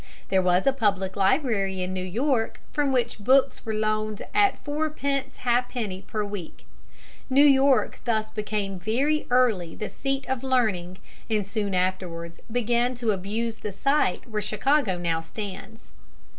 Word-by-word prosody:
There 190 -1 +3
was 180 0 +2
a 275 - +4
public 195 -7 0
library 195 -3 +1
in 185 +1 -3
New 185 -1 -3
York, 230 +5 0
from 290 -2 +1
which 240 -3 0
books 265 +5 +3
were 220 -2 -3
loaned 215 0 -1
at 410 -1 +4
fourpence 290 -2 -2
ha'penny 240 -5 0
per 210 +1 -3
week. 200 -5 -7 0.6
New 275 +2 +6
York 275 -1 +4
thus 220 -2 0
became 205 -3 -3
very 275 +10 0
early 225 -10 +2
the 215 - -4
seat 275 0 -3
of 260 -2 -1
learning, 210 -9 0 0.3
and 210 -3 +1
soon 200 -1 -2
afterwards 180 -2 -2
began 240 +1 +1
to 235 -2 0
abuse 215 +4 -2
the 210 - -4
site 275 +1 +1
where 215 -2 -2
Chicago 215 0 +1
now 170 -2 0
stands. 200 +5 -8
220 Hz, 145 wpm, -26 LUFS, 190-260 Hz, 0.6 s, New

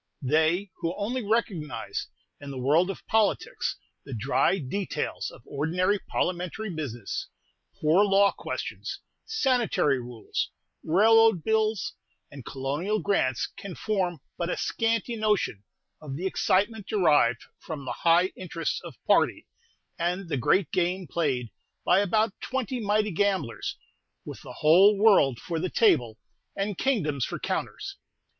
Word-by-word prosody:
They 160 +8 +2
who 170 +2 -2
only 235 +5 -2
recognize 200 - -2 0.3
in 145 - -9
the 135 - -6
world 150 +8 +3
of 195 - -6
politics 220 -2 0 0.3
the 135 - -7
dry 135 - +2
details 190 +6 -3
of - - -15
ordinary 180 +8 0
parliamentary 180 +5 -2
business, 130 - -4 0.5
poor 160 +6 +4
law 200 0 +4
questions, - - -5 0.3
sanitary 250 - +1
rules, 120 -2 -4 0.3
railroad 220 +1 +5
bills, 220 -2 +1 0.4
and 140 -3 -9
colonial 145 - -2
grants 165 - +1
can 200 -3 -8
form 185 -7 -1 0.2
but 170 0 -1
a - - -1
scanty 230 +1 0
notion 210 - 0 0.4
of 145 -3 -6
the 175 +6 -4
excitement 205 +3 +1
derived 150 - +3 0.2
from 150 -4 -7
the 125 - -3
high 175 +3 +4
interests 165 -3 -3
of - - -9
party, - - +3 0.5
and 175 +1 -1
the 150 - 0
great 165 +7 +2
game 180 +1 0
played 135 -7 -1 0.3
by 180 +2 +5
about 215 +2 +2
twenty 255 -1 -2
mighty 210 -1 +1
gamblers, 185 -8 -1 0.5
with - - -8
the - - -10
whole 190 +7 +6
world 195 - +5
for 165 +4 -4
the 185 +2 -1
table, 120 - +3 0.4
and 200 -1 -2
kingdoms 155 - 0
for - - -3
counters. - - -4
180 Hz, 135 wpm, -27 LUFS, 150-205 Hz, 0.5 s, whole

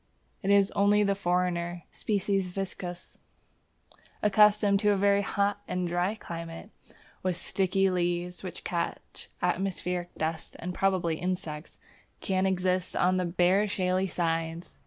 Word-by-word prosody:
It 195 - -2
is 200 0 +5
only 205 +1 +4
the 200 -1 +2
foreigner 175 -2 -1
(S. - - -8
viscosus), 195 -3 -2 1.0
accustomed 210 -1 +5
to 210 0 +3
a 205 - +3
very 200 +1 +3
hot 200 +1 0
and 180 -1 -1
dry 175 +4 0
climate, 165 +1 -8 0.2
and - - -24 0.3
with 185 -2 -1
sticky 195 +1 +1
leaves 175 0 -1
which 185 - -7
catch 170 -1 -4
atmospheric 180 -1 -1
dust 160 +1 -3
and 180 +1 -5
probably 180 -4 +1
insects, 170 -4 -4 0.4
that - - -12
can 190 -1 +2
exist 185 -1 0
on 185 +1 +3
the 180 - 0
bare 180 +4 +3
shaly 185 -1 0
sides. 165 -1 -2
185 Hz, 135 wpm, -28 LUFS, 175-195 Hz, 1.0 s, is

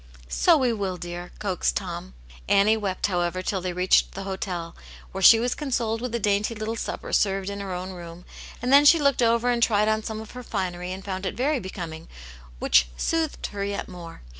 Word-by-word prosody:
" - - -21
So 330 - +4
we 255 -4 +1
will, 195 -4 -3
dear," 175 0 -7
coaxed 185 - -1
Tom. 60 0 -5 0.3
Annie 200 +2 +5
wept, 200 -4 -2
however, 180 -1 -1
till 190 0 -1
they 180 0 -2
reached 180 +1 +2
the 195 - -6
hotel, 185 -3 -4 0.4
where 190 - -5
she 225 +4 +9
was 245 +1 0
consoled 235 -6 -2
with 245 -1 -3
a - - 0
dainty 205 +2 +1
little 215 +1 -3
supper - - -5
served 195 -1 +1
in 200 - -5
her 195 -1 -5
own 180 +1 -4
room, 175 -1 -10 0.4
and 250 +2 +1
then 285 +1 +8
she 310 +3 +8
looked 280 -4 +2
over 235 +1 +3
and 240 -1 0
tried 210 -2 +3
on 220 0 +1
some 220 0 -5
of 220 -1 -9
her 250 - -8
finery 180 -5 -3
and 190 +1 -7
found 190 -1 -3
it - - -4
very 275 +3 +1
becoming, 170 -5 -7 0.5
which 60 +1 +4
soothed 325 -2 -1
her 200 -1 -4
yet 200 0 -3
more. 170 - -10
200 Hz, 215 wpm, -25 LUFS, 180-230 Hz, 0.5 s, she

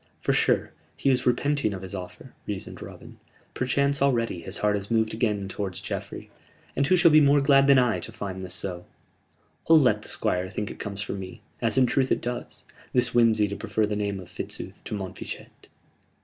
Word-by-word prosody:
"For - - 0
sure, - - +2 0.3
he 135 - +2
is 130 -1 +1
repenting 125 -3 +1
of 95 - -8
his 95 - -7
offer," 90 -2 -8
reasoned - - -5
Robin. - - -11 0.3
"Perchance 140 +2 +1
already 115 -9 +1
his 95 +3 -2
heart 105 0 +1
is 100 0 -4
moved 110 -1 +1
again 105 -3 -1
towards 95 -2 -4
Geoffrey, - - -6 0.4
and 140 0 +1
who 185 - +4
shall 170 -2 +6
be 155 0 +7
more 145 0 +5
glad 140 -1 +5
than 140 -1 +7
I 125 -3 +3
to - - -7
find 100 -4 -6
this 90 0 -2
so? 90 -1 -3 0.8
I'll 165 - +9
let 130 -4 +3
the - - -10
Squire 90 +1 -1
think 105 +2 -4
it - - -11
comes 100 0 -4
from 100 - -5
me 95 +4 -9 0.2
as 115 +2 +2
in 130 - +6
truth 130 +2 +1
it - - +3
does 120 0 -6 0.3
this 125 -1 +3
whimsey 115 -3 +4
to 100 - -4
prefer 110 0 0
the 105 0 -2
name 100 -1 -2
of 90 - -10
Fitzooth - - -7
to - - -4
Montfichet!" 95 -2 -8
110 Hz, 205 wpm, -26 LUFS, 100-130 Hz, 0.8 s, I'll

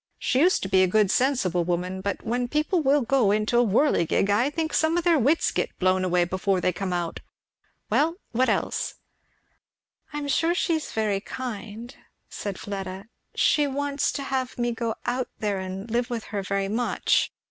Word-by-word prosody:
She 255 - 0
used 360 +6 +3
to - - -2
be 190 0 +4
a 185 - +4
good 205 +1 +3
sensible 225 -11 +1
woman; 180 +2 -2
but 200 +1 -3
when 245 +2 -1
people 305 +6 +1
will 285 0 +3
go 240 -3 +2
into 215 +3 +2
a - - +5
whirligig, 205 - +2
I 235 +7 +3
think 315 0 -3
some 320 +2 +2
of 345 - 0
their 335 -3 +4
wits 285 +7 +2
get - - -2
blown 185 0 +2
away 180 -1 +2
before 185 +2 0
they 180 0 +1
come 190 +1 -3
out. 175 -2 -2 0.7
Well 325 +3 +2 0.2
what 255 +3 +2
else?" - - -1 1.2
"I 295 - -5
am 290 -1 -3
sure 330 +5 +2
she 350 -1 +1
is 315 -1 -2
very 210 -3 0
kind," 235 +1 -7 0.3
said 200 -2 -5
Fleda. 195 +1 -6 0.3
"She 295 -1 +3
wants 280 +1 -1
to 280 - -3
have 265 -2 -2
me 240 0 0
go 230 -1 -2
out 250 +1 -1
there 205 -2 -1
and 190 +2 -6
live 240 +2 0
with 235 -2 -3
her 200 - -1
very 195 0 -1
much. 230 +4 +1
230 Hz, 190 wpm, -25 LUFS, 195-275 Hz, 1.2 s, a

